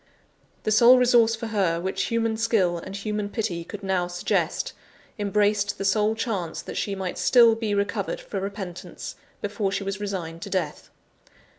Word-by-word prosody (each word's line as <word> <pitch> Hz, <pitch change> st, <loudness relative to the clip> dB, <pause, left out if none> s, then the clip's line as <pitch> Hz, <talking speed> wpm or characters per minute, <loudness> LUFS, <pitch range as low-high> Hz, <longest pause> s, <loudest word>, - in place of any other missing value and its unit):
The 215 Hz, -, 0 dB
sole 235 Hz, +4 st, +8 dB
resource 240 Hz, -2 st, +5 dB
for 230 Hz, +1 st, -6 dB
her 195 Hz, -7 st, +1 dB
which 190 Hz, +2 st, -1 dB
human 230 Hz, -1 st, 0 dB
skill 215 Hz, -7 st, +1 dB
and 190 Hz, +3 st, -8 dB
human 210 Hz, 0 st, -3 dB
pity 205 Hz, -7 st, -2 dB
could 205 Hz, +3 st, -9 dB
now 185 Hz, -2 st, 0 dB
suggest, 175 Hz, 0 st, -1 dB, 0.5 s
embraced 205 Hz, 0 st, +1 dB
the 195 Hz, -, -3 dB
sole 210 Hz, +2 st, +2 dB
chance 200 Hz, -8 st, -2 dB
that -, -, -7 dB
she 200 Hz, -, -1 dB
might 190 Hz, -2 st, -4 dB
still 235 Hz, -2 st, +6 dB
be 220 Hz, -2 st, -1 dB
recovered 200 Hz, -, -1 dB
for -, -, -5 dB
repentance, 195 Hz, -3 st, -6 dB, 0.3 s
before 205 Hz, -1 st, -1 dB
she 195 Hz, -, -2 dB
was 195 Hz, 0 st, -3 dB
resigned 180 Hz, -5 st, -4 dB
to 200 Hz, -, -6 dB
death. 180 Hz, -6 st, -3 dB
205 Hz, 165 wpm, -25 LUFS, 190-220 Hz, 0.5 s, sole